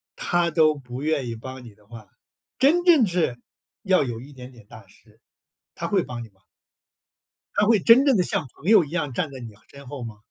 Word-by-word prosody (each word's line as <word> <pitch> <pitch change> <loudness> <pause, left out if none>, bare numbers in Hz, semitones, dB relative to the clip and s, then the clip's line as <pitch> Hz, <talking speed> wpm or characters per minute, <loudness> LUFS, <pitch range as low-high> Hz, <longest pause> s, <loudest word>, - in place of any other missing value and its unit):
他 175 -1 0
都 155 -1 +3
不 130 -2 -9
愿 150 -5 -1
意 115 - -5
帮 130 +2 -9
你 105 -3 -14
的 105 -1 -26
话， 110 -2 -13 0.5
真 315 +7 +3
正 315 -10 +6
是， 170 -9 -1 0.4
要 190 -7 +2
有 120 -1 -6
一 140 +3 -13
点 130 -1 -12
点 115 -4 -17
大 - - -14
事， - - -24 0.6
他 - - -4
会 - - +1
帮 120 -2 -7
你 - - -14
吗？ 95 -1 -35 1.2
他 210 - +3
会 220 -2 +4
真 240 +8 +6
正 265 -7 +4
的 180 - +2
像 155 - -2
朋 150 - -18
友 205 -4 +6
一 145 - -10
样 160 -6 -3
站 160 -2 -2
在 130 - -9
你 115 -3 -10 0.2
身 140 -2 -13
后 130 -2 -7
吗？ 110 -2 -8
140 Hz, 235 characters per minute, -23 LUFS, 120-180 Hz, 1.2 s, 正